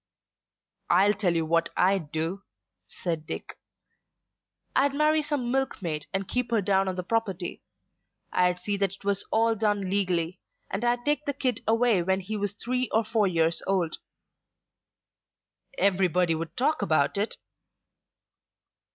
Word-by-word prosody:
"I'll 195 +4 +5
tell 190 -4 0
you 165 -1 +1
what 165 +1 +1
I'd 180 -5 +2
do," 165 +5 -2 0.5
said 165 -3 -4
Dick. - - -6 1.2
"I'd 280 +1 +3
marry 305 +1 +3
some 290 -5 -2
milk 270 0 0
maid 155 -5 -4
and 195 -1 -2
keep 250 -2 -1
her 230 -2 +2
down 195 0 +2
on 185 - -2
the 180 - -3
property. 195 -4 -2 0.7
I'd 180 0 +2
see 200 +3 -2
that 195 -1 0
it - - -21
was 200 0 0
all 225 +1 +3
done 205 -3 0
legally, 180 -3 0 0.3
and 195 +4 -2
I'd 240 0 +1
take 295 0 +1
the 285 - -1
kid 255 -4 -1
away 225 -3 +3
when 190 +2 0
he 215 +4 -5
was 205 -1 -2
three 250 +4 -2
or 225 - +3
four 220 -1 +1
years 165 -2 +2
old." 185 -4 0 1.8
"Everybody 180 -3 +3
would 165 +1 -5
talk 275 +2 +1
about 155 -7 +2
it." 205 +3 0
195 Hz, 150 wpm, -27 LUFS, 180-230 Hz, 1.8 s, I'll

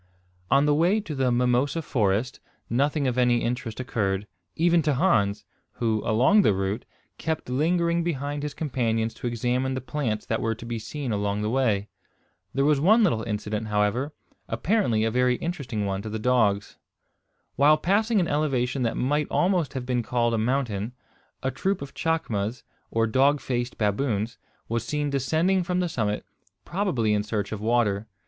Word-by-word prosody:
On 140 +1 +4
the 150 - +3
way 175 +8 +3
to 170 -7 -6
the 130 -3 +1
mimosa 125 +6 +1
forest 110 -1 0 0.3
nothing 140 +4 +1
of 125 -1 0
any 120 -1 +3
interest 120 -1 -3
occurred, 105 -6 -1 0.3
even 170 +1 +3
to 150 -2 +1
Hans, 110 - +2 0.3
who, 110 -3 0
along 130 - +4
the 105 - +3
route, 95 +4 -2 0.3
kept 160 -5 -3
lingering 170 +4 +1
behind 145 -3 -2
his 150 0 -4
companions 115 -6 -1
to 120 - -5
examine 125 +3 -1
the - - -1
plants 125 -5 -3
that 110 - -1
were 115 0 0
to 115 - -10
be 115 -1 -3
seen 130 +4 -5
along 100 0 -1
the 105 - -1
way. 110 -6 +1 0.6
There 135 +1 +1
was 150 -1 +3
one 215 +8 +5
little 135 - +2
incident, 105 0 -3
however. 105 +7 0 0.4
Apparently 185 - +1
a 110 - +1
very 125 +1 +2
interesting 135 -10 -3
one 95 0 -2
to 110 - -6
the 110 - -3
dogs. 110 -4 +1 0.8
While 150 +3 +5
passing 210 +6 +2
an 175 - +1
elevation 135 -4 0
that 115 -2 0
might 145 +3 +1
almost 175 -6 +1
have 130 -3 -4
been 125 -1 0
called 120 0 0
a - - +1
mountain, 115 -2 -1 0.5
a 130 - 0
troop 195 +7 -1
of 140 0 -8
chacmas, 125 -9 -1 0.3
or 115 0 +1
dog 135 +6 +3
faced 120 -2 -3
baboons 110 +1 -1 0.3
was 115 0 -1
seen 145 +2 -2
descending 160 +8 +1
from 180 +1 -1
the 180 - +1
summit, 105 -9 -2 0.4
probably 155 - 0
in 105 - +2
search 105 -1 -3
of 105 -1 -4
water. 110 -2 +1
125 Hz, 170 wpm, -26 LUFS, 110-150 Hz, 0.8 s, one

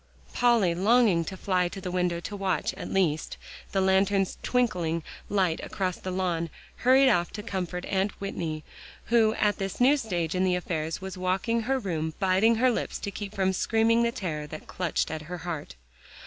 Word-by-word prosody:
Polly, 235 -8 +3
longing 200 -1 +4
to 190 - -6
fly 185 -2 +1
to 185 - -7
the 185 -1 -5
window 180 -1 0
to 205 - -6
watch, 190 -5 -1
at - - -7
least, 160 -5 0 0.3
the 195 - +1
lantern's 190 0 +2
twinkling 175 -10 0 0.3
light 185 -5 +1
across 185 -3 -2
the 190 - -6
lawn, 180 -3 -1 0.3
hurried 260 +2 +5
off 175 -9 +2
to 210 - -6
comfort 180 -4 -3
Aunt 195 +1 -1
Whitney, 165 -6 -4 0.5
who 220 -2 +5
at 210 -1 +1
this 195 -1 -4
new 260 +4 +6
stage 175 - -2
in 185 0 +1
the 185 -1 +2
affairs, 165 -2 -3
was 190 0 -6
walking 190 +6 0
her 265 +4 0
room, 160 -8 -3
biting 195 +5 +4
her 250 +3 +3
lips - - -2
to 200 - -5
keep 205 +1 -7
from 190 -1 +1
screaming 225 +4 +2
the 235 0 +2
terror 155 -9 -4
that 155 +1 -8
clutched 180 -4 -1
at 160 -1 -4
her 180 - -4
heart. 155 - -5
190 Hz, 185 wpm, -27 LUFS, 175-215 Hz, 0.5 s, new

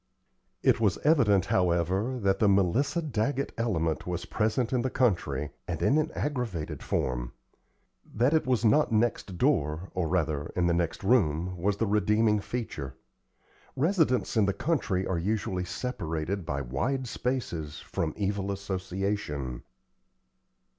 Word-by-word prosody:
It - - +4
was 105 -6 +2
evident, 120 - +4
however, 90 +7 +1
that 95 0 +2
the 105 - +4
Melissa 100 - +2
Daggett 140 0 -1
element 85 -10 -1
was 90 -1 -3
present 110 +3 0
in 125 - +2
the 130 - 0
country, 85 - 0 0.2
and - - -3
in 150 - +4
an 155 +1 -1
aggravated 120 - -3
form. - - -2 0.8
That 125 +7 +2
it 160 -4 +2
was 125 -3 +2
not 115 +7 +4
next 110 -4 0
door, 85 - +1
or, 90 -3 -1
rather, 80 -3 0
in 90 - +2
the 85 - +3
next 85 +1 -1
room, 90 -6 +2
was 100 +3 0
the 115 - +1
redeeming 105 +1 +3
feature. 90 - -5 0.8
Residents 155 -5 +2
in 105 -3 +4
the 100 - +1
country 100 - 0
are 90 -3 -1
usually 95 -1 -1
separated 85 -4 -3
by 70 -4 -1
wide 125 - -2
spaces 100 - -3
from 80 -2 -3
evil 100 -1 -1
association. 95 -8 -3
100 Hz, 140 wpm, -28 LUFS, 85-120 Hz, 0.8 s, It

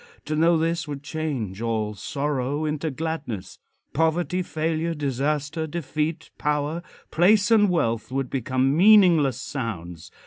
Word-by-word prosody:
To 155 - -2
know 165 +2 +4
this 165 0 -1
would 145 -1 -6
change 135 - -4
all 110 -2 -1
sorrow 140 +6 -2
into 155 +1 -2
gladness. 145 - -5 0.3
Poverty, 170 +4 +1
failure, 165 0 -2
disaster, 145 +3 -1
defeat, 155 0 -3
power, 150 +2 -1 0.3
place 200 +6 +4
and 210 -3 +5
wealth 115 -10 0
would 135 -1 -2
become 130 +1 +1
meaningless 175 - +6
sounds. 90 - -5
150 Hz, 125 wpm, -24 LUFS, 130-165 Hz, 0.3 s, meaningless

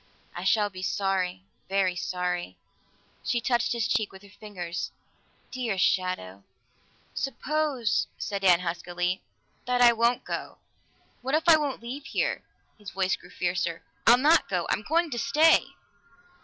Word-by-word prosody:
I 175 - -5
shall 205 +1 +3
be 185 -1 -8
sorry, 185 -1 -1 0.3
very 190 -2 +1
sorry." 180 - -3 0.7
She 240 - 0
touched 240 0 +1
his 235 -2 0
cheek 215 - 0
with 190 +1 -14
her 200 - -15
fingers. 185 -5 -5 0.6
"Dear 240 -6 -2
shadow!" 180 - 0 0.7
"Suppose," 270 -2 -1
said 200 -1 -3
Dan 180 -2 +5
huskily, 175 +1 -2 0.5
"that 250 0 +1
I 240 -1 +7
won't 235 +2 +1
go. - - -5 0.6
What 265 +4 0
if 320 +2 0
I 330 - +9
won't 290 -6 -2
leave 265 +4 -6
here?" - - -1 0.4
His 205 -1 -8
voice 190 -1 0
grew - - -16
fiercer. 175 -2 -2 0.2
"I'll 240 +2 +9
not 305 +6 +4
go! 180 -3 0
I'm - - 0
going 325 +7 +1
to 240 - -2
stay!" 320 +6 +4
205 Hz, 145 wpm, -27 LUFS, 180-245 Hz, 0.7 s, I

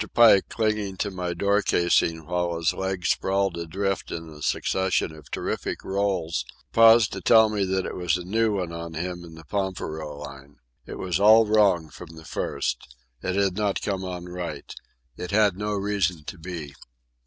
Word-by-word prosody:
Pike, 115 -5 +6
clinging 105 -3 -1
to 100 - -2
my 90 -2 -3
door 100 +3 +2
casing 85 -3 +1
while 90 0 -1
his 80 -3 +1
legs 95 -2 -2
sprawled 95 -1 0
adrift 95 +4 -3
in 80 -1 -6
a 75 -1 -12
succession 95 +2 0
of 75 -1 -14
terrific - - -3
rolls, 95 -7 -1 0.3
paused 115 -1 +6
to - - -5
tell 110 -1 +6
me 105 -2 0
that 95 0 -1
it - - -4
was 90 -1 0
a 90 - -7
new 110 +3 +1
one 90 -3 -3
on 85 -1 -7
him 90 +1 -4
in 80 -1 -11
the 80 0 -13
pampero 80 -4 -4
line. 70 -1 -10 0.3
It - - -7
was 90 -1 -1
all 110 +2 +7
wrong 100 -7 +3
from 80 -2 -11
the 80 0 -12
first. 65 - -3 0.3
It 95 - -2
had 100 -2 +1
not 105 -1 -1
come 95 -2 -2
on 90 -1 -5
right. 90 -1 -6 0.4
It 90 - -5
had 105 -2 +3
no 105 +2 -3
reason 100 -5 -1
to 85 - -8
be. 80 -4 -7
90 Hz, 180 wpm, -25 LUFS, 85-100 Hz, 0.4 s, all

